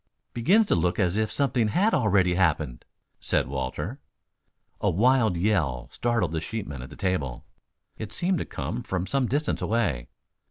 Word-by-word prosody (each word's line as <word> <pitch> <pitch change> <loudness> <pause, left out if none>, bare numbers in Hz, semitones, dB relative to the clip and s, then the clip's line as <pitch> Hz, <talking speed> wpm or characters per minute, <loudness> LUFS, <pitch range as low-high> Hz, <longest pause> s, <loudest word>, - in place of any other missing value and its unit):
"Begins 190 - +4
to - - +1
look 90 +1 +1
as 95 -3 +1
if 110 0 0
something 120 -1 +1
had 195 - +2
already 100 -6 +3
happened," 85 -9 0 0.3
said - - +1
Walter. 70 - -4 0.8
A - - +2
wild 115 0 +3
yell 85 - 0
startled 115 -9 0
the 80 -1 -2
sheepmen 80 - -5
at 65 - -8
the - - -11
table. 90 -11 -2 0.5
It 110 - -5
seemed 180 -1 0
to - - -3
come 120 - -4
from 95 -6 -2
some 135 +3 0
distance 145 +5 -1
away. 100 - 0
100 Hz, 160 wpm, -26 LUFS, 80-120 Hz, 0.8 s, Begins